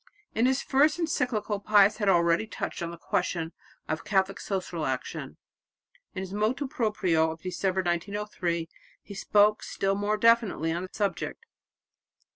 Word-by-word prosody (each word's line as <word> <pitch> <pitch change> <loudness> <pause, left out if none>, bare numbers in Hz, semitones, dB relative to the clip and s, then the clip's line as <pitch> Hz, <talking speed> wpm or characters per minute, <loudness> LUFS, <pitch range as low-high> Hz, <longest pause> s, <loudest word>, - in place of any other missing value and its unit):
In 230 +3 +3
his 265 +1 +1
first 285 +5 +3
encyclical 240 -11 -1
Pius 205 0 +4
had 205 -3 +1
already 170 +3 +3
touched 210 - -5
on 170 - -2
the 170 - -8
question 165 -1 -2 0.4
of 155 +1 -3
Catholic 195 -1 +1
social 180 -5 -3
action. 130 -1 -4 0.8
In 185 - -3
his 190 0 -6
motu 225 +7 0
proprio 190 -10 +1
of 160 0 -7
December 185 +1 -1
1903 175 -1 -2 0.4
he 200 - -10
spoke 210 +2 +3
still 195 0 -1
more 205 +2 0
definitely 220 -8 +3
on 170 +1 -2
the 185 - -6
subject. 205 - -3
195 Hz, 145 wpm, -28 LUFS, 175-215 Hz, 0.8 s, Pius